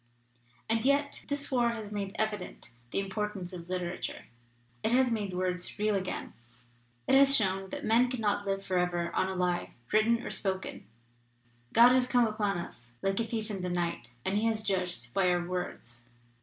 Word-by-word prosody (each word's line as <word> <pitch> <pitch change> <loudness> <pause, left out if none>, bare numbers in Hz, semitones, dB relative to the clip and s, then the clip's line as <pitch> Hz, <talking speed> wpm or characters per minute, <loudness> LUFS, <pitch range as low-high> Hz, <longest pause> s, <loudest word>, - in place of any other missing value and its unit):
/ 120 +1 -34
"And 225 0 +2
yet 280 +2 +1
this 285 0 -2
war 240 -2 +3
has 215 -3 -6
made 200 -1 -4
evident 215 - -3 0.2
the - - -3
im 195 -1 -4
portance 200 -3 -3
of 175 -1 -8
literature. 180 -1 -3 0.6
It 220 - 0
has 255 -1 +4
made 210 -4 -1
words 180 -1 -2
real 210 0 +2
again. 190 -2 -3 0.7
It - - +3
has 275 0 +7
shown 195 -3 +1
that - - -5
men 235 +3 +4
cannot 210 -5 0
live 195 0 -1
for 185 -1 +1
ever 175 -1 0
on 185 - +2
a 190 - -3
lie, 180 -1 -1 0.2
written 230 +2 +3
or - - -4
spoken. 190 - -3 0.8
God 235 +2 +8
has 255 0 +4
come 245 -1 +4
upon 210 -3 0
us 120 -8 -8
like 195 +1 +1
a 230 - 0
thief 220 -1 -3
in 195 -2 -4
the 180 - -2
night, 175 -8 -2 0.2
and 200 +2 +1
He 225 - +1
has 220 -1 0
judged 180 - -2
by 185 +2 +3
our 175 -1 +1
words. 120 -10 -5
195 Hz, 190 wpm, -30 LUFS, 180-225 Hz, 0.8 s, God